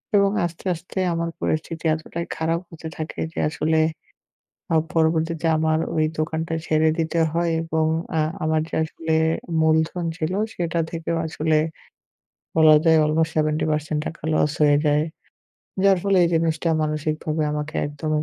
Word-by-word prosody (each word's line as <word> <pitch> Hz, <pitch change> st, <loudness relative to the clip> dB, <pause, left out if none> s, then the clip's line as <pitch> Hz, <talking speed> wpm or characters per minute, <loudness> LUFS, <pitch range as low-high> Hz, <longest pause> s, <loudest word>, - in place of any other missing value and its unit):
এবং 200 Hz, 0 st, +5 dB, 0.2 s
আস্তে, 170 Hz, +2 st, -7 dB
আস্তে 175 Hz, +3 st, -10 dB, 0.2 s
আমার 170 Hz, 0 st, -1 dB
পরিস্থিতি 160 Hz, +1 st, -2 dB
এতটাই 165 Hz, +1 st, -5 dB
খারাপ 165 Hz, +1 st, 0 dB
হতে 165 Hz, -1 st, -9 dB
থাকে 155 Hz, 0 st, -5 dB
যে -, -, -4 dB
আসলে 160 Hz, 0 st, +1 dB, 0.9 s
আ -, -, +3 dB, 0.2 s
পরবর্তীতে 165 Hz, 0 st, +1 dB
আমার 160 Hz, 0 st, +2 dB, 0.2 s
ওই 155 Hz, -, +3 dB
দোকানটা 160 Hz, +1 st, -2 dB
ছেড়ে 155 Hz, 0 st, +3 dB
দিতে 165 Hz, +1 st, 0 dB
হয় 170 Hz, 0 st, +1 dB
এবং 160 Hz, -1 st, 0 dB, 0.3 s
আ -, -, +3 dB, 0.2 s
আমার 155 Hz, 0 st, +2 dB
যে -, -, -7 dB
আসলে 160 Hz, +1 st, -4 dB, 0.5 s
মূলধন 160 Hz, +2 st, +2 dB
ছিল, 165 Hz, 0 st, -2 dB, 0.2 s
সেটা 170 Hz, -1 st, -1 dB
থেকেও 165 Hz, 0 st, -3 dB
আসলে 155 Hz, 0 st, 0 dB, 1.0 s
বলা 155 Hz, -1 st, +7 dB
যায় 160 Hz, -1 st, +5 dB
অলমোস্ট 160 Hz, +2 st, +1 dB
70% 155 Hz, 0 st, 0 dB
টাকা 160 Hz, -, -6 dB
লস 150 Hz, -1 st, +2 dB
হয়ে 145 Hz, -1 st, +5 dB
যায়। 150 Hz, +1 st, +3 dB, 0.8 s
যার 195 Hz, -2 st, +5 dB
ফলে 200 Hz, -1 st, +2 dB
এই -, -, +2 dB
জিনিসটা 165 Hz, 0 st, +1 dB
মানসিকভাবে 155 Hz, +1 st, -1 dB
আমাকে 150 Hz, +1 st, -4 dB
একদমই 150 Hz, +1 st, -2 dB
160 Hz, 145 wpm, -23 LUFS, 155-165 Hz, 1.0 s, বলা